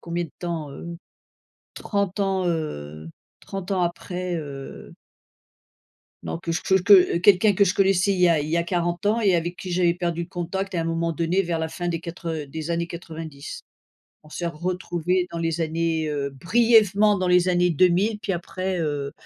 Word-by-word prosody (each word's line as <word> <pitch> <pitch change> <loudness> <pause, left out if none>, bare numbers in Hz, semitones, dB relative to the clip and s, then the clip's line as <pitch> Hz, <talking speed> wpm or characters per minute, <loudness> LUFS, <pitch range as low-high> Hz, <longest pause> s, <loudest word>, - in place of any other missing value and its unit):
combien 170 0 -3
de - - -12
temps, 165 -4 -4
heu? 170 - -8 0.9
30 200 -1 -2
ans, 190 -2 0
heu, 80 - -4 0.3
30 195 0 -7
ans 190 -2 +1
après, 180 +1 -3
heu 140 -3 -8 1.3
Donc 165 - -5
que 165 - -1
chech 190 +2 +1
que 185 -3 +6
quelqu'un 200 +3 +5
que 200 - +4
je 185 - +1
connaissais 195 0 +3
il 185 - -2
y 180 - +6
a 165 -3 +3
il 150 - -4
y 165 - +1
a 170 - +2
40 175 +2 -2
ans 220 +3 +2
et 200 -4 +3
avec 175 +1 -1
qui 185 - -7
j'avais 175 -1 +2
perdu 170 -1 -2
le 170 - -8
contact 190 +2 -4
et - - 0
à - - +1
un - - -2
moment 165 0 -1
donné 170 +4 +1
vers 170 -2 -2
la 160 0 -2
fin 175 +1 -4
des 165 -1 -2
quatre 170 0 -7
heu, 155 -2 -4
des 160 +3 -6
années 170 0 0
90. 160 -4 -8 0.6
On 155 - -17
s'est 175 - -5
retrouvé 180 +1 -1
dans 170 - -5
les 165 0 -1
années, 160 0 -1
heu, 140 -2 -2
brièvement 210 - +4
dans 185 - -1
les 180 0 +4
années 180 0 +3
2000, 185 +6 +2
puis 200 -2 -2
après, 185 +1 -3
heu 145 -3 -2
175 Hz, 195 wpm, -24 LUFS, 165-185 Hz, 1.3 s, que